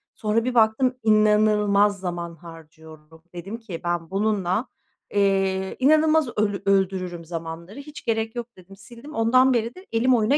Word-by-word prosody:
Sonra 220 +1 0
bir 250 0 -2
baktım, 235 +3 +3
inanılmaz 210 -2 +3
zaman 175 -2 -5
harcıyorum. 160 -1 -15
Dedim 195 +6 -6
ki: 200 -8 -8
"Ben 175 -1 -2
bununla, 200 +2 -1 0.5
eee, 195 -1 +1
inanılmaz 310 +1 +4
öl 205 -1 0
öldürürüm 185 -3 0
zamanları. 165 - -7
Hiç 300 +1 -11
gerek 225 0 -1
yok." 240 -1 -4
dedim, 190 +2 -15
sildim. 235 +9 -13
Ondan 255 +3 +4
beri 235 +3 -1
de 370 +1 -13
elim 245 +3 +2
oyuna 230 +6 +2
210 Hz, 145 wpm, -23 LUFS, 180-230 Hz, 0.5 s, inanılmaz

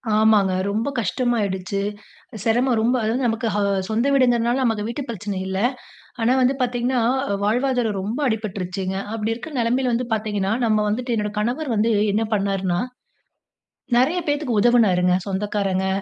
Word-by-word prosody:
ஆமாங்க 215 -3 +4 0.2
ரொம்ப 220 +5 -1
கஷ்டமா 240 +4 0
ஆயிடுச்சு. 190 0 -2 0.6
சிரமம் 240 +2 +2
ரொம்ப, 240 +3 +2
அதாவது 235 +5 0
நமக்கு 225 0 -1
ஹா 205 - +1 0.3
சொந்த 225 +3 +1
வீடுங்குறதுனால 245 -1 +3
நமக்கு 225 -3 0
வீட்டு 235 +5 -4
பிரச்சனை 205 -3 -4
இல்ல. 190 0 -2 0.6
ஆனா 235 +2 +3
வந்து 255 +2 +3
பாத்தீங்கன்னா, 245 0 0 0.4
வாழ்வாதாரம் 240 -1 +1
ரொம்ப 215 +8 -3
அடிபட்ருச்சுங்க. 190 -4 -3 0.2
அப்டி 225 0 -1
இருக்கிற 265 +7 -8
நிலைமையில 245 +2 +1
வந்து 240 +1 -1
பாத்தீங்கன்னா, 210 -2 -1
நம்ம 215 -1 +2
வந்துட்டு, 240 +3 -1
என்னோட 210 0 -2
கணவர் 250 +7 -2
வந்து 220 +2 +2 0.2
என்ன 225 +2 +1
பண்ணார்ன்னா, 195 -3 0 1.2
நெறைய 275 +9 +3
பேத்துக்கு 290 -6 0
உதவுனாருங்க. 195 -7 +4
சொந்தக்காரங்க, 195 -1 -1
225 Hz, 140 wpm, -22 LUFS, 205-245 Hz, 1.2 s, ஆமாங்க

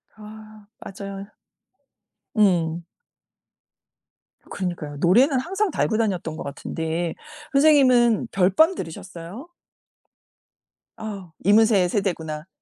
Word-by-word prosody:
아 215 -1 -13
맞아요. 195 0 -8 1.1
응. 175 -5 +2 1.7
그러니까요. 170 -6 -5
노래는 250 - +4
항상 385 +5 -1
달고 220 - 0
다녔던 185 -8 -2
것 - - -6
같은데 160 +4 -4 0.4
선생님은 255 -6 +4
별밤 195 - +3
들으셨어요? 180 - -8 1.5
아. 200 -6 -7
이문세의 205 -3 +4
세대구나. 160 -5 -3
200 Hz, 210 characters per minute, -23 LUFS, 170-225 Hz, 1.7 s, 노래는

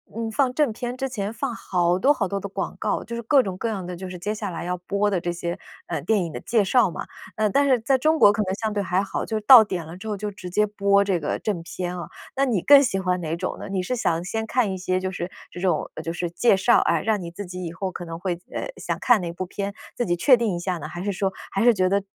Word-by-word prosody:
嗯， 225 0 -3
放 255 +1 +1
正 295 -3 +2
片 240 +3 -5
之 270 +1 -3
前 210 -4 -3
放 240 +2 -3
好 180 -4 0
多 275 +8 +5
好 235 -8 -1
多 200 +1 -2
的 200 - -5
广 195 0 -4
告， 215 - -1
就 235 +1 -6
是 - - -3
各 260 +4 +4
种 190 -4 -4
各 230 - -2
样 200 -5 -3
的， 180 0 -6
就 185 +1 -7
是 180 - -7
接 205 +5 -3
下 210 -2 -4
来 170 -1 -5
要 180 +1 -2
播 200 +3 0
的 195 -3 0
这 175 0 -2
些， 170 0 -4 0.3
呃， - - -3
电 215 -4 +1
影 170 - -5
的 - - -6
介 220 -1 +1
绍 215 +2 +3
嘛。 - - -6 0.3
嗯， 215 -1 +1
但 280 +6 +3
是 260 -3 +4
在 265 +4 +3
中 310 +5 +2
国 205 - +7
可 205 - -1
能 190 -1 -2
相 220 +1 -2
对 205 -1 -1
还 185 0 0
好， - - -3
就 220 - -3
是 215 - -5
到 255 -1 +11
点 185 -5 -4
了 165 +3 -9
之 195 - -9
后 210 - -1
就 205 +1 -4
直 185 -2 -9
接 210 +4 +2
播 200 -1 +2
这 195 -3 0
个 150 - -2
正 200 -6 -2
片 180 +1 -5
啊， 170 - -6 0.3
那 275 - +3
你 225 -9 0
更 285 +6 +8
喜 245 -8 0
欢 185 -1 0
哪 165 -1 -2
种 185 +2 -4
呢？ - - -7
你 190 -1 -1
是 225 - -2
想 170 -7 0
先 220 +5 -3
看 235 -4 +1
一 190 - -3
些 185 0 -1
就 185 0 -2
是， 180 -1 -4 0.2
这 - - -8
种 180 0 0
就 165 - -4
是 175 0 -3
介 215 +4 +4
绍 190 - +4
啊， - - +2
让 215 -3 0
你 170 - -6
自 200 +4 -7
己 180 0 -7
以 165 - -5
后 185 +2 -3
可 175 - -7
能 165 -1 -6
会， 180 -2 -2
呃， - - -3
想 - - -3
看 245 -3 +5
哪 175 - -3
一 - - -3
部 185 +2 -4
片， 200 +2 -4 0.2
自 240 - 0
己 175 - +1
确 250 +9 +5
定 225 -6 0
一 - - -3
下 180 0 -2
呢， 155 - -6
还 175 +3 -6
是 205 - -1
说 195 0 -1 0.2
还 195 - 0
是 240 0 +6
觉 185 -3 +2
得， 200 +1 +2
195 Hz, 325 characters per minute, -24 LUFS, 180-220 Hz, 0.3 s, 到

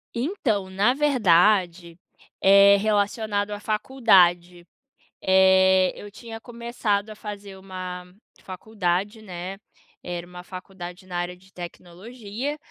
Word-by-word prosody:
Então, 235 - -1
na 200 +6 +2
verdade, 185 - +2 0.4
é 200 +1 +7
relacionado 205 0 0
à 205 - -5
faculdade, 185 -7 +2 0.6
eh, 190 0 +4
eu 205 - -10
tinha 225 +1 -10
começado 235 -4 -3
a 215 - -9
fazer 205 -2 -9
uma 185 -1 -8 0.3
faculdade, 200 +1 -3
né, 185 -1 -7 0.5
era 175 -1 -5
uma 180 0 -11
faculdade 185 -1 -10
na 180 -1 -5
área 175 +1 -3
de 190 +1 -23
tecnologia, 205 - -7
195 Hz, 110 wpm, -24 LUFS, 180-215 Hz, 0.6 s, é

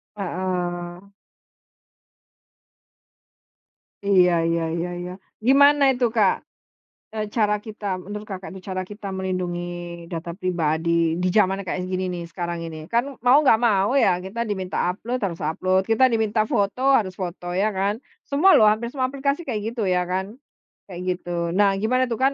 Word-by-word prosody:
Heeh. 180 -1 -4 3.0
Iya, 185 -3 +5 0.2
ya 170 - 0 0.2
ya 175 - -3 0.2
ya. 180 - -6 0.3
Gimana 285 +2 +6
itu 245 0 +1
Kak? 205 -4 +2 0.7
E - - -4 0.2
cara 210 -2 +3
kita, 215 -1 -9 0.2
menurut 210 +2 -7
Kakak 190 -1 -7
itu, 190 - -9
cara 185 0 -2
kita 205 +2 -9
melindungi 185 -2 -2 0.5
data 170 0 -5
pribadi 170 -2 0
di 180 +1 0
zaman 195 -1 +2
kayak 185 0 -3
gini 185 0 -2
nih, 175 -1 -5
sekarang 170 0 -4
ini. 160 - -7
Kan 235 +1 +3 0.2
mau 250 +4 +6
nggak 285 -6 +5
mau 205 +5 +2
ya, 185 -9 +3
kita 195 +6 -4
diminta 190 -4 -1
upload, 240 +7 -4
harus 170 -4 -2
upload, 185 +5 +1
kita 225 +3 +3
diminta 220 -1 +1
foto 210 +2 -1 0.2
harus 185 -3 -4
foto, 175 -1 -6
ya 210 +3 +2
kan, 195 +1 0 0.3
semua 315 +7 +4
loh 215 - +6
hampir 220 +3 +1
semua 260 -2 0
aplikasi 280 +4 -2
kayak 220 -5 -2
gitu 225 -5 -2
ya 180 -1 +2
kan, 190 +4 -2 0.6
kayak 180 0 -6
gitu. 175 - -12 0.3
Nah 200 0 +5
gimana 255 +4 +2
tuh 230 - -2
kan 270 - +4
195 Hz, 155 wpm, -23 LUFS, 180-220 Hz, 3.0 s, Gimana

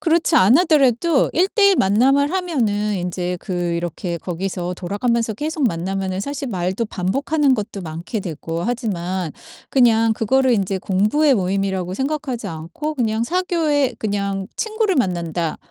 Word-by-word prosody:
그렇지 330 0 +2
안 205 +9 +6
하더라도 305 -3 +3
1:1 390 +3 +3
만남을 270 - +3
하면은 225 - 0
인제 180 0 -3
그 195 - -6 0.2
이렇게 170 +1 -3
거기서 180 +1 -4
돌아가면서 220 +5 -1
계속 300 +3 -1
만나면은 190 +2 -3
사실 280 +3 -4
말도 190 +2 -2
반복하는 275 - +1
것도 210 -3 -4
많게 170 +7 -5
되고 165 -1 -5
하지만 185 -7 -2 0.4
그냥 230 -3 +4
그거를 260 +4 +2
인제 195 -3 0
공부의 215 +11 +2
모임이라고 190 -2 -1
생각하지 265 -3 -3
않고 165 - -5
그냥 225 -4 0
사교의 310 -6 0
'그냥 200 -2 -2
친구를 435 -4 0
만난다. 170 -6 -1
215 Hz, 325 characters per minute, -20 LUFS, 185-280 Hz, 0.4 s, 안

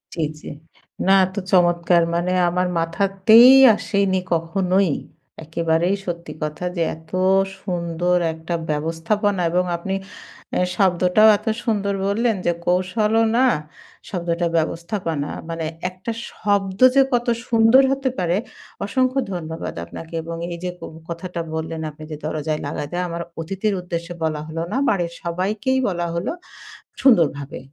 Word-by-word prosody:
জি, 165 - -2 0.2
জি। - - -12 0.6
না, 190 - +5
এত 185 +1 -9 0.2
চমৎকার 175 -1 +4
মানে 175 +1 0 0.2
আমার 180 +1 0
মাথাতেই 195 +8 +5 0.2
আসেনি 200 -3 0 0.2
কখনোই। 180 +2 +1 0.5
একেবারেই 165 +3 0
সত্যি 170 -2 -5
কথা 155 +3 -4
যে 170 - -1
এত 160 0 -19 0.5
সুন্দর 175 -1 -1 0.2
একটা 160 +2 -6 0.2
ব্যবস্থাপনা 165 +6 0
এবং 180 +1 +2
আপনি 190 +3 -4 0.6
এ্যা - - +2
শব্দটাও 185 +3 +4
এত - - -18 0.2
সুন্দর 205 -3 0
বললেন 225 +3 +1
যে, 175 - +3
কৌশলও 210 +5 +2
না 260 - +5 0.6
শব্দটা 170 -2 -1
ব্যবস্থাপনা। 165 -2 -2 0.2
মানে 165 -1 -3 0.2
একটা 185 +5 -6 0.2
শব্দ 195 -2 -1 0.2
যে 275 - +7
কত 240 0 +1 0.2
সুন্দর 230 +3 +6
হতে 270 -1 0
পারে; 175 +1 +1 0.5
অসংখ্য 255 +5 +1
ধন্যবাদ 160 -2 -5
আপনাকে। 160 - -10
এবং 165 +1 -6 0.2
এই 170 - -4
যে 180 - -1
ক - - -35 0.3
কথাটা 170 +1 -5
বললেন 160 0 -4
আপনি 150 +1 -12
যে, - - -3
দরজায় 155 0 -2
লাগাতে 145 +2 -5
আমার 170 0 -4 0.2
অতিথির 195 +6 -2
উদ্দেশ্যে 170 -1 -5
বলা 155 -2 -1
হলো 165 +1 -4
না। - - -1
বাড়ির 175 -4 0
সবাইকেই 200 +9 -1
বলা 175 -2 -1
হলো, 170 +1 -2 0.7
সুন্দরভাবে। 160 - +3
175 Hz, 135 wpm, -21 LUFS, 165-200 Hz, 0.7 s, যে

